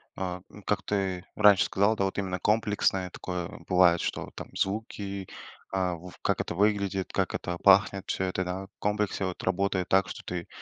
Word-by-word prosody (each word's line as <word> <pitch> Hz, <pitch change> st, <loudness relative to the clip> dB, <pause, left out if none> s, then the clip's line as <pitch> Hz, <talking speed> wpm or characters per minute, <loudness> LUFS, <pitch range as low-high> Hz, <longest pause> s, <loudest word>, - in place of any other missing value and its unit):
а, 90 Hz, -1 st, -4 dB
ну, 105 Hz, -, -13 dB
как 100 Hz, -1 st, 0 dB
ты 95 Hz, -3 st, -1 dB
раньше 105 Hz, -3 st, +6 dB
сказал, 100 Hz, +3 st, +2 dB
да, 100 Hz, -, +1 dB
вот 95 Hz, -, -3 dB
именно 95 Hz, -2 st, -2 dB
комплексное 105 Hz, -3 st, +1 dB
такое 90 Hz, -1 st, -5 dB, 0.2 s
бывает, 90 Hz, -2 st, +5 dB
что -, -, -3 dB
там -, -, -7 dB
звуки, 100 Hz, -1 st, -3 dB, 0.5 s
а 90 Hz, -2 st, +1 dB
в 90 Hz, +2 st, -11 dB
как -, -, +1 dB
это -, -, -4 dB
выглядит, 100 Hz, -1 st, +1 dB
как -, -, 0 dB
это 90 Hz, -1 st, -3 dB
пахнет, 95 Hz, 0 st, +4 dB
всё 95 Hz, -, -1 dB
это, 95 Hz, 0 st, -1 dB
да, 90 Hz, +2 st, -4 dB
в 100 Hz, -, -43 dB
комплексе, 105 Hz, -1 st, 0 dB
вот, 90 Hz, -1 st, -5 dB
работает 95 Hz, 0 st, 0 dB
так, 95 Hz, -1 st, +4 dB
что -, -, -7 dB
ты, 90 Hz, -1 st, -5 dB
95 Hz, 185 wpm, -28 LUFS, 90-100 Hz, 0.5 s, раньше